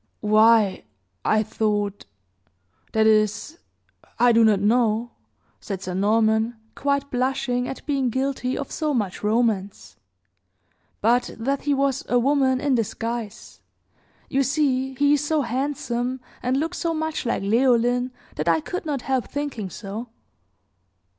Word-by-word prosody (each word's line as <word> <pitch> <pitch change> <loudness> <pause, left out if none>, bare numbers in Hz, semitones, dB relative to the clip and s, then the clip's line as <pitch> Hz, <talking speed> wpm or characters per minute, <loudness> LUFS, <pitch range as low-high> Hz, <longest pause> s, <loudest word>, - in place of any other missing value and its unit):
"Why, 215 -1 +4 0.4
I 215 0 +2
thought 205 -2 -2 0.9
that 220 0 +2
is, 220 - +1 0.6
I 245 0 +5
do 230 0 +5
not 215 -3 +4
know," 225 +2 +1 0.5
said 195 -2 -6
Sir 180 - -4
Norman, 220 +4 +2 0.2
quite 280 0 -1
blushing 255 -1 0
at 265 - -7
being 275 -4 0
guilty 260 0 -1
of 280 - -5
so 305 -3 -1
much 205 -6 -2
romance, 210 -3 -1 1.0
"but 240 +3 +2
that 275 +5 -2
he 290 -1 +2
was 275 -1 0
a 245 - +3
woman 260 0 +2
in 285 0 +1
disguise. 230 -1 -4 0.7
You 275 - +1
see 265 -1 0
he 285 +2 +3
is 295 0 +1
so 300 -1 +1
handsome, 255 -1 -2 0.2
and 250 +2 0
looks 325 +5 -2
so 335 -2 -1
much 315 0 -2
like 235 -5 -1
Leoline, 245 +3 +2 0.3
that 155 +3 0
I 165 -1 +3
could 355 - -5
not 280 -4 -2
help 265 -2 -1
thinking 280 -9 -4
so." 210 +6 -7
245 Hz, 135 wpm, -23 LUFS, 220-275 Hz, 1.0 s, I